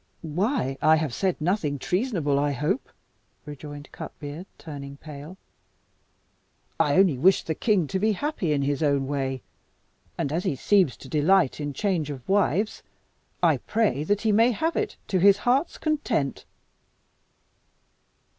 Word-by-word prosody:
"Why, 165 - -1
I 155 - +6
have 155 -5 -1
said 190 +4 0
nothing 155 -3 0
treasonable, 180 - 0
I 145 0 +1
hope?" 150 - -1 0.6
rejoined 145 0 -9
Cutbeard, 150 +5 -8
turning 140 -3 -8
pale; 150 +4 -10 1.4
"I 150 -3 +3
only 180 -9 +4
wish 185 +6 +4
the 160 - -2
king 200 0 +1
to 190 - -1
be 215 +2 +2
happy 245 - -2
in 140 -2 +1
his 140 +2 -1
own 140 -3 +2
way. 135 -2 -2 0.7
And 140 - -1
as 170 +4 -1
he - - 0
seems 185 0 +2
to - - -12
delight 155 +3 +3
in 145 -1 -3
change 170 -2 -1
of 135 -4 -7
wives, 200 +1 +1 0.6
I - - +5
pray 215 - 0
that 205 +4 +1
he 220 - +2
may 225 +4 +5
have 325 +9 -1
it 425 -1 -2
to 190 - +2
his 200 +2 +6
heart's 255 +8 +1
content." 255 - -1
160 Hz, 145 wpm, -25 LUFS, 145-205 Hz, 1.4 s, I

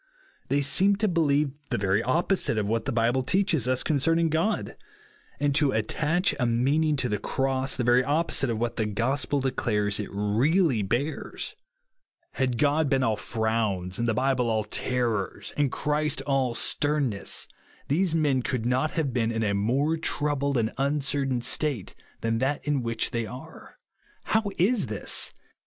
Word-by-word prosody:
They 145 0 +2
seem 190 +9 +3
to 215 +2 0
believe 150 -5 +2 0.2
the - - 0
very 100 +1 +1
opposite 165 - 0
of 105 - 0
what 115 +4 -1
the 135 - -1
Bible 120 +2 +1
teaches 165 - +1
us 130 0 +1
concerning 165 +3 +2
God; 165 +7 -1 0.6
and 145 0 +1
to 145 -1 +2
attach 155 - +1
a 125 - +2
meaning 140 +7 +2
to 130 -3 -1
the 105 -3 -1
Cross, 135 0 -1
the 125 - -1
very 120 +1 +4
opposite 145 -2 +1
of 115 - -1
what 120 +1 -2
the 110 - 0
gospel 130 +6 0
declares 105 -6 0
it 105 - -4
really 115 - +2
bears. 120 +10 -3 0.8
Had 130 -3 -1
God 145 +2 +2
been 135 -1 +2
all 110 -3 +2
frowns, 110 -4 -1
and 120 - 0
the 110 - +1
Bible 130 -1 +1
all 110 -1 +1
terrors, 115 -3 -2
and 145 -3 +1
Christ 150 +1 0
all 135 -4 +1
sternness, 140 -8 -1 0.4
these 165 +3 +1
men 145 -5 +2
could 120 -2 -2
not 130 +5 +1
have 145 -6 0
been 115 -2 +1
in 115 -1 -1
a 100 -2 +1
more 130 +11 +1
troubled 145 -3 0
and 110 -1 0
uncertain 135 -2 0
state 135 -5 0 0.3
than 115 0 0
that 135 +3 -1
in 145 -3 +1
which 115 0 -1
they 115 -3 -2
are. 125 +3 -11 0.5
How 220 -2 +1
is 205 +3 +2
this 105 -2 -1
130 Hz, 165 wpm, -26 LUFS, 115-150 Hz, 0.8 s, very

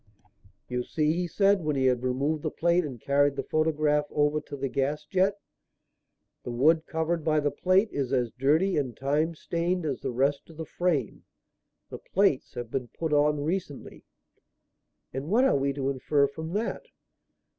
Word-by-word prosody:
"You 125 0 -2
see," 150 +4 0
he 175 +1 -1
said, 195 0 +2
when 150 -1 0
he 135 -1 +1
had 125 -2 +2
removed 140 +5 -1
the - - -1
plate 170 +1 +1
and 135 -6 -6
carried 140 +3 +2
the - - -3
photograph 155 -1 +1
over 150 +1 +1
to 145 - -8
the 135 0 -2
gasjet, 150 +9 0 1.1
"the - - -7
wood 155 +7 +3
covered 160 0 -1
by 155 -1 +2
the 145 -1 0
plate 190 +4 +2
is 135 -3 -2
as 125 -4 +1
dirty 155 - +2
and 130 -5 -2
time 150 +5 0
stained 170 +2 -2
as 140 -4 -2
the - - -3
rest 140 +5 0
of 160 - -14
the 160 - -5
frame. 155 -7 -1 0.7
The - - -7
plates 190 -8 0
have 120 -1 -6
been 130 -2 -2
put 160 +6 -4
on 150 0 +2
recently." 160 -3 -4 1.1
"And 135 +3 -4
what 240 +7 +4
are - - +3
we 140 0 +1
to 135 0 -1
infer 140 +2 +2
from 160 +4 -6
that?" 230 - -3
150 Hz, 175 wpm, -27 LUFS, 135-165 Hz, 1.1 s, what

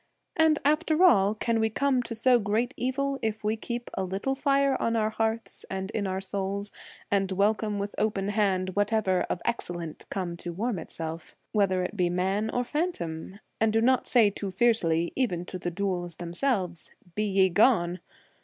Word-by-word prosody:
And 320 -2 +4
after 310 +3 +3
all, 205 - +5
can 230 +1 0
we 220 0 +2
come 265 +2 +1
to 230 -1 -6
so 245 +2 +4
great 225 +5 0
evil 275 +2 -1
if 220 -1 -2
we 215 +1 +1
keep 235 +2 -5
a 190 - -2
little 195 +8 -2
fire 275 0 +2
on 230 - +1
our 215 -1 +1
hearths 225 +1 -2
and 190 +1 -4
in 205 -3 -1
our 190 0 -2
souls, 200 +1 -3 0.4
and 195 -1 +1
welcome 210 +2 +1
with 200 +1 -3
open 200 -2 0
hand 195 -3 +1
whatever 205 -2 +1
of 175 - -3
excellent 175 -8 -4
come 180 -3 -3
to 175 0 -6
warm 215 +2 -2
itself, 160 0 -7 0.2
whether 190 -4 +2
it 180 +3 -4
be 180 -3 +1
man 190 +5 0
or 245 - 0
phantom, 205 - -3 0.2
and 220 0 +3
do 225 - +3
not 255 +3 +3
say 225 -5 +5
too 200 0 -5
fiercely, 185 -6 +2
even 180 -10 0
to 185 - -7
the 175 - -2
dhouls 175 -2 -2
them 170 -1 -6
selves, 185 - -1
' 175 - -26
Be 210 +3 0
ye 195 -2 +3
gone 180 -3 +3
205 Hz, 185 wpm, -27 LUFS, 185-235 Hz, 0.4 s, all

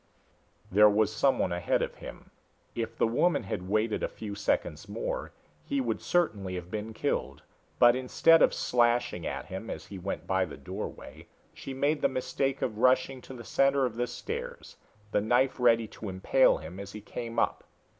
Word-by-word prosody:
There 105 +2 +7
was 105 0 +2
someone 135 -1 +2
ahead 90 0 0
of - - -3
him. - - -11 0.4
If 115 -1 -4
the - - +3
woman 125 +7 +2
had 95 -2 -5
waited 110 +1 +1
a - - 0
few 105 -2 -7
seconds 100 - -1
more - - -4 0.3
he 280 -1 -1
would 260 - -1
certainly 100 - 0
have 90 0 -7
been 110 +1 -4
killed; - - -2 0.3
but 120 0 +6
instead 130 +6 +4
of - - +6
slashing 120 -7 +1
at - - -4
him 95 +4 -7
as - - -6
he 95 - -9
went 95 +2 -4
by 95 -1 +1
the 80 - -10
doorway, 95 +9 -8 0.3
she - - -8
made 145 +3 +1
the - - +4
mistake 135 +1 -2
of 110 -3 -2
rushing 130 +1 +3
to 130 - -10
the 120 - -9
center 135 +1 +2
of 120 -3 -3
the 120 +1 -1
stairs, 480 - -6 0.4
the - - +2
knife 125 +5 +2
ready 115 -2 +4
to 105 - -7
impale 95 +8 +3
him 80 +4 -9
as 100 0 -8
he 105 - -7
came 115 +2 -6
up. - - +1
115 Hz, 185 wpm, -29 LUFS, 100-130 Hz, 0.4 s, There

